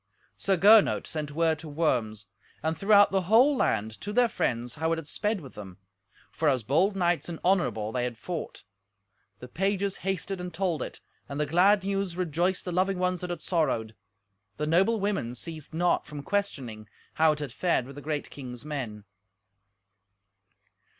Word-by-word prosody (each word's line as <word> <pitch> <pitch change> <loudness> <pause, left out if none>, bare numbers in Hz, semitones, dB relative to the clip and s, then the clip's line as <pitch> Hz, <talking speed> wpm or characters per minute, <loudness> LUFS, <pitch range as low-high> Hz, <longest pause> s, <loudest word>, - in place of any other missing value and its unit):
Sir 195 -1 +1
Gernot 205 +4 +6
sent 155 -3 -4
word 160 +1 +1
to 160 - -8
Worms, 120 - -1 0.4
and 160 +1 0
throughout 205 +4 +5
the 195 -1 +2
whole 255 +7 +6
land, 110 - 0
to 205 - -4
their 245 +3 +4
friends, 120 - -2
how 160 +2 -1
it - - +3
had 165 -3 -7
sped 210 +1 -1
with 135 - -11
them; 95 -4 -10 0.5
for 155 -1 +1
as 130 -4 +1
bold 170 - +2
knights 175 -2 0
and 165 - -6
honourable 175 - +1
they 125 +1 -1
had 120 -2 -3
fought. 165 - -6 0.8
The 125 - -8
pages 195 +6 -1
hasted 195 0 -3
and 180 0 -5
told 175 -2 -1
it, - - -6 0.3
and 140 +1 -4
the 150 - +2
glad 185 +6 +4
news 195 -2 -2
rejoiced 180 +1 0
the 180 - -3
loving 185 +2 +1
ones 180 -1 0
that 180 - -4
had 175 -2 -5
sorrowed. 130 - 0 0.6
The 150 - -1
noble 190 +8 +3
women 195 - -1
ceased 155 +1 -8
not 175 +2 +1
from 150 -1 -7
questioning 130 - -3 0.3
how 160 -1 +6
it - - -7
had 145 -5 -5
fared 170 -7 +1
with 135 +1 -11
the 145 - -8
great 150 0 -3
king's 125 -2 -8
men. 120 -9 -5
165 Hz, 175 wpm, -28 LUFS, 140-190 Hz, 0.8 s, Gernot